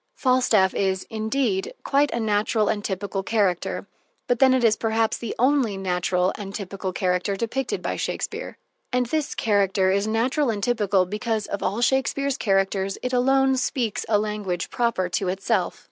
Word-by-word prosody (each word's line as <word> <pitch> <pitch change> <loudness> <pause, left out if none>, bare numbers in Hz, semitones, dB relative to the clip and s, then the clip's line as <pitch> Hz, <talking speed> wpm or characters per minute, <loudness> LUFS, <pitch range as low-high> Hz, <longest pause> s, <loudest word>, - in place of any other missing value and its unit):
Falstaff 250 -7 +3
is, 190 -1 0
indeed, 220 -2 -1
quite 285 +1 +2
a 235 - -2
natural 215 0 +1
and 205 -1 -1
typical 195 0 -3
character; 195 -3 0 0.4
but 245 -1 0
then 265 -1 +6
it 260 -1 +2
is 220 -2 +5
perhaps 225 0 0
the 230 - -5
only 255 -5 +2
natural 180 0 0
and 200 -1 -6
typical 195 -1 -4
character 180 +2 0
depicted 240 +6 -3
by - - -2
Shakespeare. - - -4 0.3
And 250 0 +1
this 300 +4 -2
character 195 -3 +2
is 200 +2 +1
natural 250 +6 +1
and 205 -3 -2
typical 205 -5 +2
because, 215 +2 -2
of 200 - -4
all 215 +5 -1
Shakespeare's 270 +2 +1
characters, 195 -1 0
it 250 0 -2
alone 265 +1 +3
speaks 250 -4 -1
a 215 - +4
language 205 -4 -3
proper 235 -7 0
to 185 +2 -1
itself. 190 +1 -1
210 Hz, 160 wpm, -24 LUFS, 195-245 Hz, 0.4 s, then